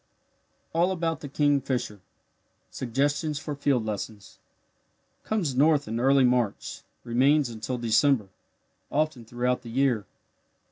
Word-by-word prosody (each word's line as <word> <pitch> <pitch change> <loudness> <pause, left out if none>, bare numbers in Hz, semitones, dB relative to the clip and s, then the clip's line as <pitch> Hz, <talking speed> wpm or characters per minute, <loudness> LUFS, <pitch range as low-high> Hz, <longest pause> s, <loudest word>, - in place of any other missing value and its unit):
ALL 175 +3 +2
ABOUT 165 -3 -1
THE 145 - -8
KINGFISHER 135 -7 0 0.7
SUGGESTIONS 145 +5 -1
FOR 150 +1 -5
FIELD 140 -5 0
LESSONS 105 -1 -6 0.8
Comes 195 -11 -1
north 145 +2 +3
in 115 +2 -3
early 135 +2 +4
March 125 -4 0 0.2
remains 130 +4 +3
until 115 +3 -4
December, 115 -1 +2 0.6
often 150 -5 -1
throughout 125 +2 -1
the 120 - -10
year. 120 -5 +1
130 Hz, 110 wpm, -26 LUFS, 115-145 Hz, 0.8 s, early